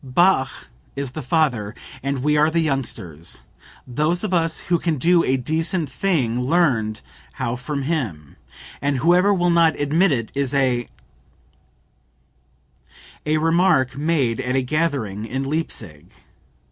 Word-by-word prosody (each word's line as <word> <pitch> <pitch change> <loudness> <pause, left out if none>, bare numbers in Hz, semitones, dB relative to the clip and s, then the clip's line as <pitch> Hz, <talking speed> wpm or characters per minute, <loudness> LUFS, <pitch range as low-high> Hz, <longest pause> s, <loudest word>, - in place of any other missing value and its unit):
"Bach 135 0 +1 0.3
is 140 -2 -4
the - - -6
father, 125 -7 0 0.3
we 140 +2 0
are 150 +1 +4
the 165 +1 0
youngsters. 115 - -4 0.4
Those 155 - 0
of 205 -3 -2
us 165 -2 +1
who 175 -1 0
can 165 -3 -1
do 170 +5 +4
a 130 - +1
decent 160 +4 -1
thing 130 -11 0
learned 125 -8 +1 0.3
how 120 - -2
from 140 +3 -4
him; 110 - -3 0.5
and 140 -1 0
whoever 180 +8 +4
will 175 -3 +2
not 165 -2 +3
admit 155 +6 +3
it 115 -5 -1
is 140 -1 -1
a..." 125 -3 +1 2.4
(A 155 +1 +2
remark 165 -4 +2
made 140 -6 0
at 125 +1 -2
a 135 - +2
gathering 125 -8 -1
in 130 +3 -3
Leipsic. 110 - -4
140 Hz, 135 wpm, -22 LUFS, 125-165 Hz, 2.4 s, are